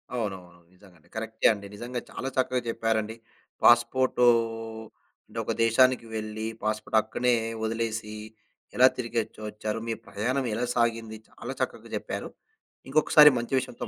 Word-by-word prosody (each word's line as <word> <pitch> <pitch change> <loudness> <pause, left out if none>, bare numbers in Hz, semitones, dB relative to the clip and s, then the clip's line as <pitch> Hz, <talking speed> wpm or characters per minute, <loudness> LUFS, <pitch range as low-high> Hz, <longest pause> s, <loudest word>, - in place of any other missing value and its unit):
అవునవును, 95 -6 -5
నిజంగండి. 90 -4 -21
కరెక్టే 110 0 +1
అండి, 100 -1 -9
నిజంగా 120 +3 -5
చాలా 135 - -4
చక్కగా 130 -1 +1
చెప్పారండి. 110 -1 -1 0.5
పాస్పోర్టూ 125 +1 +4 1.0
అంటే, - - -6
ఒక - - -1
దేశానికి 125 +2 +4
వెళ్లి, 110 0 -4 0.2
పాస్పోర్ట్ 110 +1 0
అక్కనే 120 +3 0 0.3
వదిలేసి, 110 -1 -2 0.6
ఎలా 130 +1 +7
తిరిగొచ్చు 115 -3 -3
వచ్చారు, 105 +1 -4
మీ 115 - 0
ప్రయాణం 130 +6 -1
ఎలా 120 +3 -1
సాగింది, 115 -2 0
చాలా - - -7
చక్కగా - - -3
చెప్పారు. - - -5 0.6
ఇంకొకసారి 150 +1 +7
మంచి 120 +3 -1
విషయంతో 120 - -6
115 Hz, 125 wpm, -27 LUFS, 110-125 Hz, 1.0 s, ఎలా